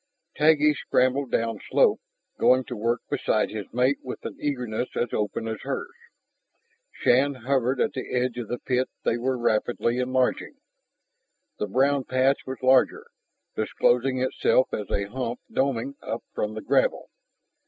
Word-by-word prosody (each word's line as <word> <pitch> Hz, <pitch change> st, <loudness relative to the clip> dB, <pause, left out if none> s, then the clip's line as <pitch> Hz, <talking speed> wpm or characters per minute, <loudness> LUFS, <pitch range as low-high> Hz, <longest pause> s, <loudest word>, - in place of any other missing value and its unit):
Taggi 150 Hz, 0 st, +4 dB, 0.2 s
shambled 130 Hz, +1 st, +2 dB
downslope, 115 Hz, -3 st, +2 dB, 0.4 s
going 130 Hz, +1 st, +4 dB
to 125 Hz, -, -7 dB
work 115 Hz, +2 st, 0 dB
beside 125 Hz, -6 st, 0 dB
his 105 Hz, -2 st, -6 dB
mate 125 Hz, +3 st, +2 dB
with 130 Hz, -, -8 dB
an -, -, -5 dB
eagerness 125 Hz, -5 st, -2 dB
as 120 Hz, -, -1 dB
open 105 Hz, +2 st, -2 dB
as 110 Hz, -1 st, -4 dB
hers. 140 Hz, -, -4 dB, 1.0 s
Shann 135 Hz, +3 st, +2 dB
hovered 130 Hz, +1 st, 0 dB
at -, -, +1 dB
the 130 Hz, -, -6 dB
edge 125 Hz, -1 st, 0 dB
of 115 Hz, -, -5 dB
the 120 Hz, -, -3 dB
pit 125 Hz, +1 st, -1 dB
they 120 Hz, -, +1 dB
were 130 Hz, +1 st, 0 dB
rapidly 120 Hz, +1 st, 0 dB
enlarging. 130 Hz, 0 st, 0 dB, 1.0 s
The 105 Hz, -, -1 dB
brown 135 Hz, +5 st, +2 dB
patch 130 Hz, +2 st, +1 dB
was 130 Hz, 0 st, -6 dB
larger, 130 Hz, 0 st, +4 dB, 0.5 s
disclosing 125 Hz, +4 st, +1 dB
itself 130 Hz, 0 st, +2 dB
as 105 Hz, -, -3 dB
a 100 Hz, -, 0 dB
hump 120 Hz, +3 st, -4 dB
doming 135 Hz, 0 st, 0 dB
up -, -, -5 dB
from 105 Hz, +1 st, -2 dB
the 110 Hz, -, -5 dB
gravel. -, -, +1 dB
125 Hz, 145 wpm, -25 LUFS, 115-130 Hz, 1.0 s, Taggi